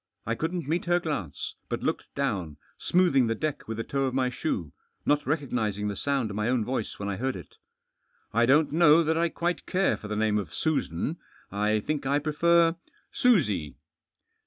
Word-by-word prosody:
I 115 - 0
couldn't 165 +4 -3
meet 165 +3 0
her 175 0 +3
glance, 140 - -4 0.2
but - - -3
looked - - -1
down, 100 - -2 0.2
smoothing 170 -9 +3
the 115 - 0
deck 155 +4 -3
with 115 0 -4
the 115 - -2
toe 135 +2 -1
of 130 -1 -2
my 130 -1 +1
shoe, 95 - -3 0.3
not 145 -2 +2
recognising 115 -9 -1
the 100 - -3
sound 135 -2 -1
of - - -6
my 105 +2 0
own 125 -4 +1
voice 125 -3 -3
when 100 - -4
I 100 -2 -2
heard 130 +2 -1
it - - -10 0.4
" - - -42
1 120 +2 +3
don't 150 +3 +4
know 165 0 +6
that 160 +1 +1
I 170 +1 +2
quite 175 +1 -2
care 190 +1 +2
for 105 - -9
the 105 - -3
name 105 -1 +2
of 90 -6 -6
Susan. 155 - -1 0.3
I 105 +1 +1
think 145 +2 -2
I 140 +1 +3
prefer 165 +3 +3 0.2
— - - -36
Susie." 105 - +3
135 Hz, 200 wpm, -27 LUFS, 105-160 Hz, 0.4 s, know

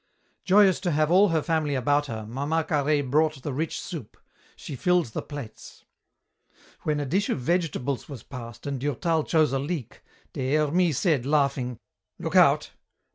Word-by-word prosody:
Joyous 195 -1 +5
to 180 - -1
have 155 0 +1
all 195 +3 +6
her 160 -4 0
family 155 -4 0
about 145 +3 +1
her, 110 -3 -5
Mama 145 +7 -1
Carhaix 145 -2 +1
brought 150 0 +1
the 145 - -3
rich 155 +4 -2
soup. 160 - -8 0.4
She 145 - -8
filled 180 +5 +2
the - - -2
plates. 140 -7 -10 1.0
When 150 -1 -1
a 145 - -2
dish 190 +9 0
of - - 0
vegetables 140 -3 -1
was 135 -6 -8
passed 120 -3 -9
and 140 -2 -3
Durtal 155 +4 0
chose 155 -4 +2
a 135 - +1
leek, 145 -3 -5 0.3
Des 130 +2 -1
Hermies 155 0 +2
said, 140 -6 +1
laughing, 140 -4 +1 0.4
"Look - - -4
out! - - +5
145 Hz, 165 wpm, -26 LUFS, 135-165 Hz, 1.0 s, all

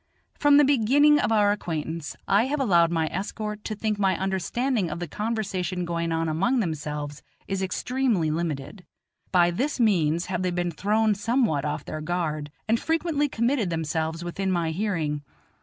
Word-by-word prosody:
From 290 -1 +4
the 295 - +7
beginning 285 +3 +4
of 225 - 0
our 205 -2 +4
acquaintance 160 -5 -4
I 200 +4 +4
have 295 +2 -1
allowed 175 -10 +4
my 165 -2 +1
escort 210 +2 -4
to 215 - -3
think 210 0 -2
my 195 -2 +2
understanding 195 +3 -1
of 155 - -5
the 175 - -4
conversation 190 -3 -2
going 170 -1 -2
on 165 0 0
among 195 +12 +1
themselves 150 -5 -3 0.3
is 195 -1 -2
extremely 205 -3 0
limited. 160 +2 -3 0.5
By 175 -2 +4
this 265 - -2
means 170 -7 +2
have 180 -1 -2
they 185 - 0
been 175 0 -1
thrown 210 +6 +2
somewhat 205 - +1
off 150 - -3
their 155 - -5
guard, 155 -3 -2 0.2
and 225 +1 +2
frequently 320 -3 0
committed 235 -4 0
themselves 160 0 -2
within 190 +2 -2
my 170 -3 0
hearing. 160 -6 -1
185 Hz, 165 wpm, -25 LUFS, 165-225 Hz, 0.5 s, the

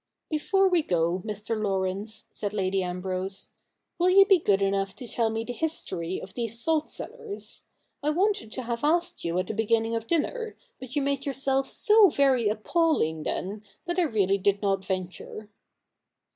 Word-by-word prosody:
' - - -58
Before 385 +6 +3
we 355 -3 +3
go, 175 - 0
Mr. 210 +1 -3
Laurence,' 200 +1 -1
said 205 -1 -4
Lady 190 -1 +1
Ambrose, 185 +1 -3 0.2
' - - -54
will 355 +1 +4
you 390 +1 +8
be 390 -3 +5
good 200 -8 +2
enough 195 0 0
to 245 - -8
tell 230 -1 +1
me 225 0 -2
the 245 - -5
history 185 - -3
of 190 - -10
these 230 -1 -3
salt 315 +3 +1
cellars? 460 -4 -6 0.4
I 295 - 0
wanted 355 - +1
to 255 - -4
have 235 +1 -3
asked 345 +3 +1
you 170 +1 -1
at 185 - +1
the 220 - -4
beginning 225 +1 +1
of 230 0 -3
dinner, 445 +8 -1 0.2
but 255 -1 -8
you 290 - +1
made 280 0 -1
yourself 270 0 +1
so 425 -2 +5
very 265 -7 +3
appalling 215 - +1
then, 195 +6 -3 0.2
that 345 +1 -1
I 350 - +4
really 200 - +1
did 200 +1 +1
not 195 -1 +1
venture.' 190 +3 -5
225 Hz, 180 wpm, -27 LUFS, 195-310 Hz, 0.4 s, you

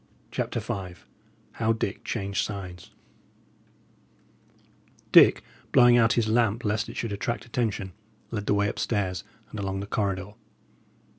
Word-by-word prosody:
CHAPTER - - -2
V 90 -2 -5 0.6
HOW 115 0 +1
DICK 105 -2 -3
CHANGED 100 -3 -2
SIDES 90 -4 -7 2.2
Dick, - - +7 0.3
blowing 120 -1 +7
out 115 0 +4
his 115 -2 +1
lamp 115 +1 +2
lest 105 +2 0
it - - -8
should 115 - -2
attract 115 +4 -3
attention, 110 -6 -2 0.4
led 105 -3 -4
the 105 - +3
way 100 0 +2
up - - -4
stairs 95 -6 -1 0.3
and 110 - -6
along 95 -1 -2
the 100 - -4
corridor. 100 -1 -2
105 Hz, 135 wpm, -27 LUFS, 100-115 Hz, 2.2 s, Dick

